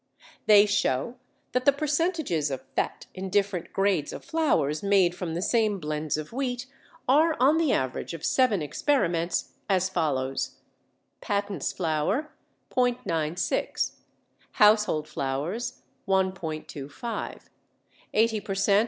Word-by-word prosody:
They 210 -1 +8
show 205 - 0 0.3
that 250 0 0
the 280 - +8
percentages 295 - 0
of 135 -2 -4
fat - - -1
in 190 +1 -5
different 200 -2 0
grades 195 -6 +1
of - - -8
flours 255 - +1
made 195 -3 +3
from 175 -2 -4
the 175 - -2
same 215 -3 +2
blends 150 -1 -2
of 155 +7 -6
wheat 250 -1 -2 0.4
are 310 +5 +4
on 280 +5 +5
the 320 -5 +2
average 130 +5 -1
of 160 - -6
seven 225 - +3
experiments 170 - 0 0.2
as 190 -1 +2
follows: 135 -7 -1 0.6
patents 200 -5 -1
flour 165 - -1 0.4
·96: 180 -10 0 0.6
household 210 -8 +4
flours 145 - -3 0.3
1·25: 185 - -3 0.7
80 220 0 +3
per 195 -1 -4
cent. 200 +1 +4
195 Hz, 120 wpm, -27 LUFS, 155-240 Hz, 0.7 s, They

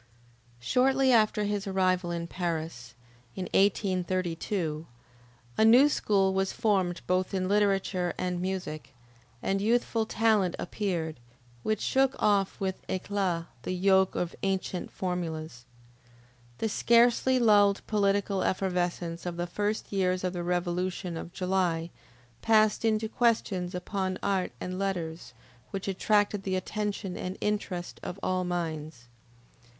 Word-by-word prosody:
Shortly 265 - +3
after 215 -2 +3
his 205 0 -2
arrival 185 -2 +1
in 170 -1 -3
Paris, 165 -9 -4 0.4
in 190 - -3
1832, 185 -4 0 0.7
a - - +6
new 245 +6 +7
school 195 -8 +2
was 190 0 0
formed 190 -5 0
both 185 +1 0
in 185 -1 0
literature 195 -3 +1
and 180 -1 -2
music, 180 -7 -4 0.5
and 195 0 0
youthful 225 0 +1
talent 215 -6 +2
appeared, 170 - -3 0.4
which 215 - -1
shook 270 0 +2
off 200 -2 +1
with 190 -1 -2
eclat 185 -3 -1 0.2
the 185 - -3
yoke 190 +1 +3
of 175 -1 -2
ancient 190 -2 -2
formulas. 160 -8 -4 0.9
The 225 - -1
scarcely 235 +4 +4
lulled 205 -4 +4
political 200 -2 +1
effervescence 180 -2 -1
of 170 -1 -4
the 175 - -1
first 205 +4 -2
years 185 -2 0
of 185 0 -1
the 175 - -3
revolution 180 0 -2
of 165 +1 -6
July, 180 -3 0 0.5
passed 215 -1 +3
into 220 -1 +1
questions 210 -6 0
upon 185 0 -2
art 195 -2 0
and 185 +1 -4
letters, 175 -4 -3 0.3
which 195 0 -5
attracted 205 +1 +1
the 190 -1 -2
attention 200 0 -3
and 185 +1 -5
interest 200 -4 -3
of 185 - -6
all 185 0 0
minds. 155 -7 -4
190 Hz, 125 wpm, -28 LUFS, 175-205 Hz, 0.9 s, new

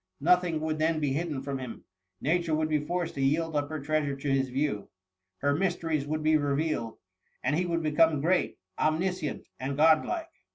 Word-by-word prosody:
Nothing 175 0 +3
would 155 0 -1
then 160 0 +2
be 145 -3 0
hidden 150 -3 -2
from 140 -1 -3
him. 125 -3 -7 0.4
Nature 165 +1 +1
would 155 0 0
be 150 -1 +1
forced 175 +2 -2
to 135 - -4
yield 155 +4 +1
up 145 -1 0
her 155 -1 -4
treasures 145 -1 -1
to 140 -2 +1
bis 135 -1 +2
view 130 -6 -1 0.2
— 95 0 -57
her 145 0 +3
mysteries 165 -4 0
would 155 +1 -2
be 155 0 +5
revealed, 145 -5 -1 0.5
and 135 +4 +1
he 180 +2 0
would 165 -1 -1
become 155 0 +3
great, 175 +5 +1 0.2
omniscient, 160 0 0
and 135 +1 -3
god 155 +1 +6
like. 335 -1 -4
155 Hz, 195 wpm, -29 LUFS, 140-165 Hz, 0.5 s, god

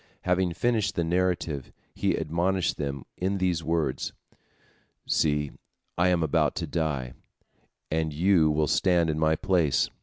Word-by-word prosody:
Having 90 -1 +1
finished 115 -2 0
the 85 - +1
narrative, 85 -5 -1 0.2
he - - 0
admonished 85 +3 0
them 70 -2 -4
in 95 +2 -1
these 90 -3 0
words: 80 -5 -1 0.9
"See, 75 -2 +1 0.4
I 85 +1 +3
am 90 -2 +2
about 80 - +1
to - - -2
die, 70 -7 -2 0.8
and 80 0 0
you 85 +1 +3
will 75 0 +2
stand 85 +1 +2
in 75 - -3
my 80 0 +3
place. 80 -5 +1
80 Hz, 140 wpm, -27 LUFS, 75-90 Hz, 0.9 s, I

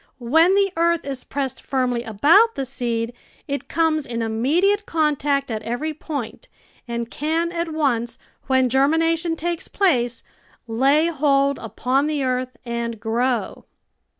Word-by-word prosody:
When 320 +10 +4
the 395 -1 +3
earth 340 0 +2
is 270 -2 -5
pressed 270 -2 -4
firmly 250 -3 -1
about 300 - +4
the 270 - -2
seed 240 -3 -3 0.3
it 280 0 -4
comes 315 -3 +1
in 235 -1 -3
immediate 330 - +1
contact 290 -4 0
at 215 -1 -3
every 245 +8 -3
point, 285 -6 -6 0.4
and 235 0 -4
can 325 +3 -1
at 340 -1 -3
once, 240 -7 -1 0.3
when 260 -1 +3
germination 325 +6 +2
takes 340 +1 -3
place, 250 - +1 0.4
lay 270 +7 +3
hold 280 -3 +2
upon 270 +4 0
the 300 -2 -1
earth 255 -1 -2
and 235 -1 -3
grow. 235 +2 -1
275 Hz, 135 wpm, -22 LUFS, 240-320 Hz, 0.4 s, When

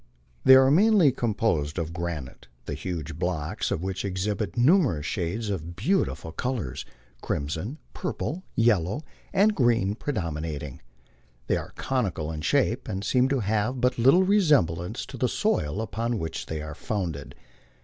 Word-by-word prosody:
They 130 - +9
are 130 0 +6
mainly 195 -2 +5
composed 105 - 0
of 85 -1 -3
granite, 85 -9 -5 0.2
the - - -4
huge 80 -3 -5
blocks 85 -4 -2
of 85 - -2
which 95 0 -3
exhibit 100 0 -2
numer 135 - +4
ous 75 - -6
shades 100 +6 -2
of 85 -2 -5
beautiful 130 - 0
colors, 115 - -3 0.4
crimson, 80 - -3 0.2
purple, 170 +5 -3
yellow, 115 - +2 0.3
and 205 +2 +4
green 115 - +2
predominat 80 - -3
ing. 70 -4 -8 0.6
They - - +1
are - - -7
conical 95 -12 -1
in 80 -1 -5
shape, - - +1
and 95 +1 -3
seem 125 +5 +2
to 135 -2 +1
have 110 +5 0
but 125 0 +1
little 135 +10 +6
resemblance 145 - +2
to - - -9
the - - +1
soil 75 +6 0
upon 115 +2 -2
which 80 -4 -4
they 80 -1 -4
are 80 0 -6
founded. 85 -5 -4
100 Hz, 150 wpm, -26 LUFS, 80-130 Hz, 0.6 s, They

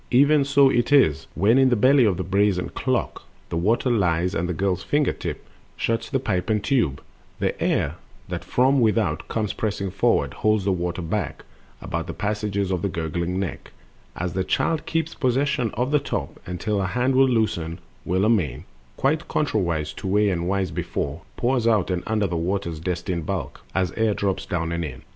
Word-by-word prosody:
Even 140 +3 +5
so 140 -1 +5
it 120 +2 +1
is, 130 - +4
When 110 +8 +4
in 135 -1 +5
the 120 - +3
belly 130 +3 +5
of 95 -5 +2
the - - -2
brazen 100 -1 +1
clock - - -2 0.3
The - - -3
water 110 +9 +1
lies, 90 -4 +1
and 90 -1 -1
the - - +1
girl's 95 +1 0
finger 145 +10 +1
tip - - -6 0.3
Shuts 115 0 -1
pipe 110 -10 -1
and 105 -2 +1
tube: 115 - +1 0.3
the - - 0
air, - - 0 0.3
that - - -4
from 130 +2 +3
without 105 -8 +1
Comes 110 -3 -2
pressing 100 -3 -2
inward, 100 - +1
holds 110 -2 +1
the 100 - +2
water 90 0 -2
back 85 -2 -3 0.4
About - - -3
the - - -4
gateways 100 -2 -2
of 90 -2 0
the 100 - 0
gurgling 85 +2 -2
neck, 95 -7 -5 0.4
As 90 0 -3
the 95 - 0
child 160 - 0
keeps 165 0 -1
possession 135 -2 +1
of 125 +4 -1
the 150 - +4
top, 140 - -4
Until 95 +4 -2
her 95 - 0
hand 125 +7 +1
will 135 0 +5
loosen, 85 -9 0 0.3
when 95 +4 +1
amain— 90 - +1 0.3
Quite 150 +4 +1
contrariwise 85 - 0
to - - -5
way 105 +2 +3
and 85 -1 -2
wise 95 -2 0
before— 75 - -3 0.2
Pours 120 -1 +1
out 105 -5 +2
and 90 -1 -1
under 110 -2 +1
the 90 -2 -2
water's 85 -1 -2
destined 85 -1 -3
bulk, - - -4
As 95 -2 +1
air 110 -1 +1
drops 100 -2 -1
down 85 -1 -2
and 85 0 -2
in. 75 - -7
100 Hz, 190 wpm, -24 LUFS, 90-120 Hz, 0.4 s, Even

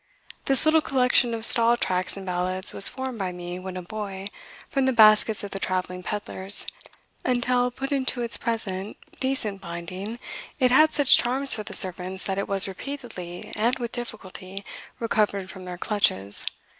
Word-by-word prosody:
"This 270 +2 +4
little 315 0 +5
collection 250 -3 +2
of 225 0 -3
Stall 235 0 +4
tracts 185 -3 -1
and 195 - -7
ballads 185 +1 -1
was 200 - +6
formed 260 -3 -5
by 190 -2 -2
me, 175 0 -7
when 185 0 -7
a 180 - -6
boy, 195 0 -6 0.4
from 270 -1 0
the - - +3
baskets 215 -1 +5
of 205 - -6
the 195 - -4
travelling 180 -1 -2
pedlars. 200 0 -1 0.6
Until 250 0 +1
put 270 +3 -6
into 260 -3 +1
its 235 - -1
present 205 -4 -3 0.2
decent 230 -7 -1
binding 185 +6 -6 0.4
it 255 -2 +3
had 310 +4 +6
such 290 -3 +7
charms 265 +3 0
for 215 - -2
the 210 - -7
servants 185 +1 +4
that 195 0 -2
it 200 - -2
was 195 -1 -1
repeatedly, 190 -5 -7
and 235 +4 +1
with 240 -2 -4
difficulty, 195 -4 -6 0.3
recovered 205 -4 0
from 185 -1 -10
their 180 -1 -6
clutches. 105 - 0
210 Hz, 170 wpm, -25 LUFS, 185-245 Hz, 0.6 s, such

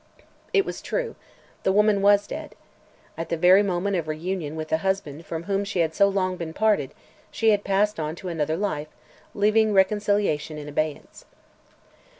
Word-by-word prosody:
It 400 -2 +3
was - - -6
true; - - -3 0.5
the 190 - +2
woman 210 0 +3
was 205 0 +5
dead. - - -7 0.6
At 165 - -4
the 170 - -1
very 180 +4 +6
moment 195 0 -1
of 165 -2 -3
reunion 160 0 -3
with 155 0 -5
the 160 - +2
husband 165 -4 -3
from 165 0 -4
whom 195 +2 -1
she 195 -3 -1
had 160 -1 0
so 200 +3 +4
long 185 -2 -1
been 165 -2 -5
parted, 215 -1 +1 0.3
she 225 -1 +2
had 205 -1 +1
passed 200 0 +1
on 155 0 -3
to 185 - -9
another 160 -2 -1
life, 160 -7 -2 0.5
leaving 215 +1 +3
reconciliation 195 -6 +1
in 150 -1 -7
abeyance. 150 0 -4
190 Hz, 170 wpm, -24 LUFS, 160-205 Hz, 0.6 s, very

